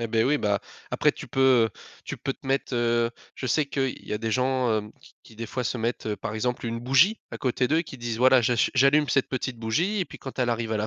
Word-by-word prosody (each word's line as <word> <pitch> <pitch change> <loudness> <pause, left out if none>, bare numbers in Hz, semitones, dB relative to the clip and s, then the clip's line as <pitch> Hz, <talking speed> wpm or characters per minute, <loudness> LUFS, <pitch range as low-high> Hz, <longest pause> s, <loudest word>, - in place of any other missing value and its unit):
Et, 115 - -1
beh, 115 0 +2
oui, 145 +3 +2
bah, 105 -4 +1 0.3
après - - +2
tu - - -10
peux, 135 - -2 0.3
heu, - - -8 0.3
tu - - -5
peux 135 - -3
te - - -26
mettre, 135 -1 -1
heu 120 0 +2 0.3
je 130 - -4
sais 150 +5 +2
qu'il 135 -2 -1
y - - -6
a 105 - -1
des 115 -1 -2
gens, 130 -2 +1
hem, 105 0 -4
qui - - -19
qui 110 - -17
des 115 0 -5
fois 125 +3 -3
se 125 - -2
mettent, 115 0 -2
heu, 105 - -1
par 110 - -5
exemple 125 +3 -2
une 115 0 -3
bougie 135 - +4
à - - -7
côté 125 -1 0
d'eux 160 +3 +2
qui 145 -5 -10
disent: 120 -1 -3
«Voilà, 130 0 +6
j'achu 120 0 +2
j'allume 140 +2 +4
cette 135 - +2
petite 130 -1 -3
bougie» 165 - 0
et 185 - +1
puis - - -12
quand 135 - -9
elle 125 - +1
arrive 115 -1 -2
à - - +1
la 105 - -1
125 Hz, 275 wpm, -26 LUFS, 115-135 Hz, 0.3 s, Voilà